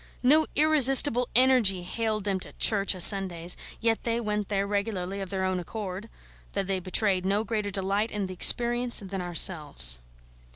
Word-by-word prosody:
No 305 +5 +3
irresistible 270 -4 +4
Energy 240 -8 +3
haled 215 +2 -4
them 195 -2 -2
to - - -11
church 200 -2 0
o' - - -9
Sundays; 180 -2 +2 0.3
yet 225 -1 -1
they 230 0 -2
went 210 -3 -4
there 200 -1 -2
regularly 200 -2 -4
of 190 - -7
their 190 0 -4
own 185 -1 -2
accord, 195 +2 -8 0.4
though 200 - -2
they 190 0 -3
betrayed 185 +1 -1
no 200 +3 -1
greater 215 -2 -4
delight 200 +2 -3
in 210 -2 -4
the 185 - -8
experience 240 +5 +4
than 190 0 -6
ourselves. 150 - +1
200 Hz, 165 wpm, -25 LUFS, 185-230 Hz, 0.4 s, irresistible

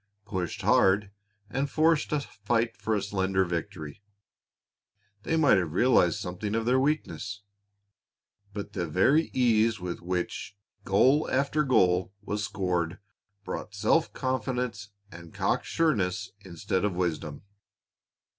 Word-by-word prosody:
Pushed 95 -5 -4
hard 100 +1 +3 0.4
and 135 +6 -2
forced 160 0 +2
to 150 -1 0
fight 115 -1 -1
for 110 +1 -1
a 100 - -1
slender 95 -2 0
victory, 85 -2 -5 1.2
they 160 - 0
might 145 -11 +5
have 80 -4 -3
realized 90 -6 +4
something 100 +4 -4
of 115 0 -1
their 125 +2 +3
weakness. 130 -8 -2 1.1
But 100 0 -7
the 90 -4 -2
very 130 - +3
ease 115 -3 +2
with 90 -1 -5
which 90 +2 -4 0.3
goal 130 +10 +3
after 140 +3 +1
goal 95 -8 +2
was 105 0 -3
scored 90 -4 -1 0.5
brought - - -6
self - - +2
confidence 125 -5 -2 0.2
and 85 -1 -12
cock - - 0
sureness 105 - 0
instead 90 +1 -2
of 105 -3 0
wisdom. 80 -5 -3
100 Hz, 125 wpm, -28 LUFS, 90-125 Hz, 1.2 s, might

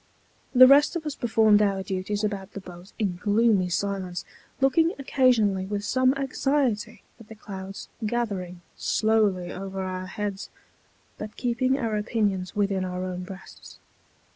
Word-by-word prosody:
The 255 +1 +10
rest 280 +5 +6
of 325 -2 -3
us 300 - -2
performed 220 -4 +3
our 195 -2 +1
duties 190 +2 -3
about 200 -2 -3
the - - -5
boat 180 0 -12
in 195 -6 -1
gloomy 205 -1 +2
silence, 190 -1 -2 0.3
looking 320 +6 +3
occasionally 235 -9 +2
with 205 0 -3
some 255 +4 +2
anxiety 270 -4 -1 0.2
at 225 - -14
the 225 - -11
clouds 195 -2 -8 0.2
gathering 200 -6 -3
slowly 210 -5 +1
over 190 0 -5
our 185 0 -4
heads, 205 0 -4 0.7
but 210 0 -7
keeping 255 +2 +1
our 230 -5 -1
opinions 205 -3 -1
within 200 -2 0
our 180 0 -4
own 180 -1 -4
breasts. 190 +1 -11
205 Hz, 140 wpm, -26 LUFS, 190-235 Hz, 0.7 s, The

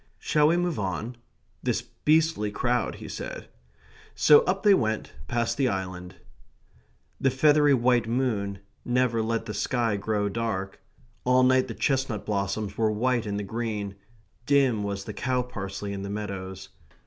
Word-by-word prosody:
"Shall 150 -1 +2
we 170 +2 +3
move 175 -5 -1
on... 100 +5 -3 0.5
this - - -1
beastly 155 -8 +1
crowd..." 120 +3 0
he - - -9
said. - - -7 0.7
So 150 - +7
up 190 +2 0
they 205 -2 +7
went, 110 - 0
past 115 - -1
the 135 -2 +2
island. 95 -3 -4 1.0
The 135 - +3
feathery 145 +2 +4
white 120 -1 +2
moon 105 -6 -1 0.2
never 120 -2 +1
let 115 0 -1
the 105 - -5
sky 115 0 0
grow 105 0 -1
dark; 100 -3 -3 0.4
all 125 0 +4
night 130 0 +4
the 115 - -6
chestnut 130 -7 -1
blossoms 100 0 -2
were 110 -1 +3
white 120 +1 0
in 100 0 -2
the 105 - -3
green; 105 -1 -3 0.5
dim 135 -6 +3
was 100 -1 -3
the - - -7
cow 125 -1 0
parsley 100 -4 -5
in 100 - -5
the 100 - -5
meadows. 95 -2 -5
115 Hz, 155 wpm, -26 LUFS, 100-130 Hz, 1.0 s, So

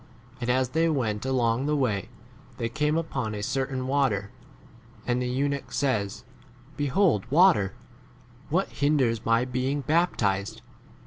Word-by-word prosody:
And 120 - -2
as 130 0 +2
they 165 +4 +2
went 120 -6 -1
along 125 0 +1
the 150 - +1
way 110 -9 0 0.5
they 115 -2 -2
came 150 +4 0
upon 135 -9 -2
a 105 - -4
certain 130 +2 -2
water, 130 -8 0 0.7
and 125 0 0
the 125 - -1
eunuch 140 +2 -2
says, 105 -6 -1 0.5
Behold 145 - +1
water; 150 - +4 0.8
what 180 +6 +1
hinders 130 -6 +1
my 115 +2 +2
being 130 +3 -1
baptized 120 - 0
130 Hz, 130 wpm, -26 LUFS, 115-145 Hz, 0.8 s, water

